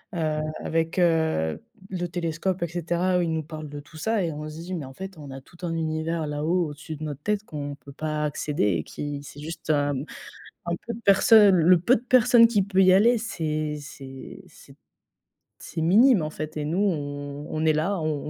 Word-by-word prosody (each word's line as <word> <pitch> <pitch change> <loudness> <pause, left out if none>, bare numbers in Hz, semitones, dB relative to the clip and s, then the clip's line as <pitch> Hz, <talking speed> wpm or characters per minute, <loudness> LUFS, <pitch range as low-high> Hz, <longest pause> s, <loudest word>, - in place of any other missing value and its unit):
heu, 155 -2 0 0.2
avec 165 +2 -1
heu, 160 - +1 0.3
le 175 -2 -2
télescope 175 +1 -2
et - - 0
cetera. 175 +2 0
Où - - +2
il 165 -1 0
nous 160 -1 -1
parle 155 -1 -8
de 145 - -7
tout 150 +2 -14
ça 220 +2 0
et 165 - -1
on 150 +1 -6
se 155 +1 -9
dit, 185 +2 -6
mais 155 -6 -4
en 130 - -11
fait, 190 +5 -8
on 145 - -9
a 135 0 -8
tout 170 - -20
un 170 -2 -2
univers 160 0 -2
là-haut, 155 +3 0
au-dessus 155 +2 -8
de 150 - -8
notre 145 -2 -5
tête 210 +2 -1
qu'on 145 -2 -5
peut 140 0 -14
pas 155 0 -3
accéder 150 0 -2
et 80 - -3
qui 145 - -6
c'est 145 - -11
juste 160 +2 -8
un 145 -1 +2
mmh, 135 +2 -4 0.6
un 170 0 -1
peu 235 - -3
de 230 - -9
personne, 200 -1 +6
le 170 +1 +5
peu 240 +9 +4
de 220 - -7
personne 240 -2 +6
qui 210 -4 +2
peut 190 0 +2
y 185 - +6
aller, 230 +5 +5
c'est 155 -8 -3
c'est 135 -2 -10
c'est - - -17
t - - -36 0.8
c'est 160 -1 -4
minime 210 - +5
en 155 - -3
fait 155 0 -6
et 150 - -2
nous, 160 +5 -1
on 145 -6 -2
on 155 0 -2
est 155 -1 +4
là, 170 +5 0
on 155 -2 -2
160 Hz, 225 wpm, -25 LUFS, 150-185 Hz, 0.8 s, personne